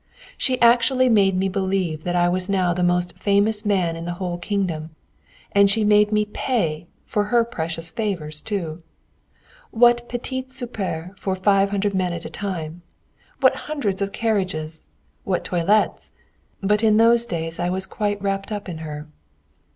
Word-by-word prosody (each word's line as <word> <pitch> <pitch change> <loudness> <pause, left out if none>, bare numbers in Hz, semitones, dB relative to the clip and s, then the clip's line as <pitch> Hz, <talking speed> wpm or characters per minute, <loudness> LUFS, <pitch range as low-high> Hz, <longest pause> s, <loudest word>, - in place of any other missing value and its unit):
She 255 -2 0
actually 250 +2 +5
made 195 -4 +4
me 190 +1 +1
believe 190 -4 -1
that 175 0 -1
I 175 0 +3
was 180 +2 0
now 185 -3 +2
the 180 - -2
most 175 0 0
famous 205 +2 +2
man 185 -6 +1
in 165 0 -6
the 175 0 -3
whole 175 -1 -4
kingdom! 170 -5 -3 0.6
And 200 0 +5
she 215 +2 +2
made 210 0 +4
me 210 0 +2
pay 170 - -2 0.2
for 205 -1 0
her 235 +1 +3
precious 165 -6 -4
favours, 165 -9 -3
too! 170 -6 -4 0.9
What 240 +1 +3
petits 260 +2 -5
soupers 190 -8 -4
for 190 -1 -1
five 195 +1 +3
hundred 200 0 0
men 185 -2 0
at 170 -1 -6
a - - -7
time! 175 -4 -5 0.6
What - - +5
hundreds 210 -11 -1
of 200 0 -1
carriages! 185 -9 -2 0.4
What 185 -2 -1
toilets!... 185 +5 +1 0.5
But 210 +2 +2
in 215 -1 +5
those 230 +1 +5
days 165 -1 -3
I 175 - 0
was 190 +1 0
quite 205 +1 -2
wrapped 195 +1 -2
up 205 -1 -4
in 170 -3 -6
her. 150 -1 -7
195 Hz, 165 wpm, -22 LUFS, 175-210 Hz, 0.9 s, actually